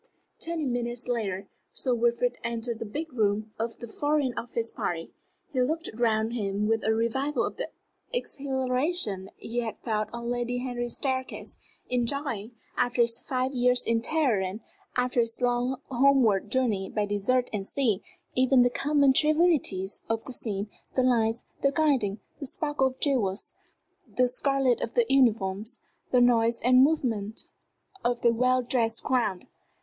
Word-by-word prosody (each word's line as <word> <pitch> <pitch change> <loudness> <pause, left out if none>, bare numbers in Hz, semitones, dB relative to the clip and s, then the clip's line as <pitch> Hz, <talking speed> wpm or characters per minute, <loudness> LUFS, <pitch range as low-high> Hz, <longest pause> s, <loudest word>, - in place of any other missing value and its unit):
Twenty 330 -2 -3
minutes 240 -1 -2
later, 200 -5 -2 0.3
Sir 255 - 0
Wilfrid 240 +1 +1
entered 235 0 -2
the - - -4
first 205 - -11
big 315 -1 -4
room 215 -1 0
of 230 +1 -2
the 235 - -8
Foreign 290 +1 0
Office 230 -1 -2
party. 165 -1 -3 0.4
He 255 - +2
looked 315 +6 0
round 225 -1 +1
him 205 -2 -1
with 225 0 +1
a 220 - +2
revival 235 +6 0
of - - -5
the - - -3 0.4
exhilaration 265 - -1
he 235 +2 -4
had 225 -3 -3
felt 215 -3 -1
on 235 0 -4
Lady 245 0 -1
Henry's 245 -1 -3
staircase, 260 -1 -3 0.3
enjoying, 245 -3 -1 0.3
after 245 0 +3
his 235 0 -1
five 255 +1 -2
years 250 -1 +3
in 230 0 +2
Teheran, 225 -9 0 0.4
after 250 0 +1
his 230 -1 +1
long 245 +1 +1
homeward 245 -6 +4
journey 220 -6 +1
by 210 -1 0
desert 205 +5 +1
and 205 -2 -1
sea, 215 -2 0 0.3
even 255 0 +5
the 245 - +2
common 280 0 +3
trivialities 300 - +2
of 225 0 -1
the 260 - -6
scene 205 -4 -2 0.3
the 255 - +3
lights, 230 -2 +2 0.2
the 275 - +3
gilding, 275 -10 +1 0.2
the 280 - -4
sparkle 290 -1 0
of 260 0 -7
jewels, 220 -9 +1 0.5
the 250 0 +2
scarlet 265 0 +1
of - - -4
the 480 - +4
uniforms, 225 -3 +2 0.3
the 250 - +4
noise 235 -1 +4
and 255 +1 +6
movement 235 -8 0 0.5
of 240 0 0
the 235 -1 +5
well 255 +2 +2
dressed 230 -2 0
crowd. 230 -9 0
245 Hz, 155 wpm, -28 LUFS, 225-260 Hz, 0.5 s, and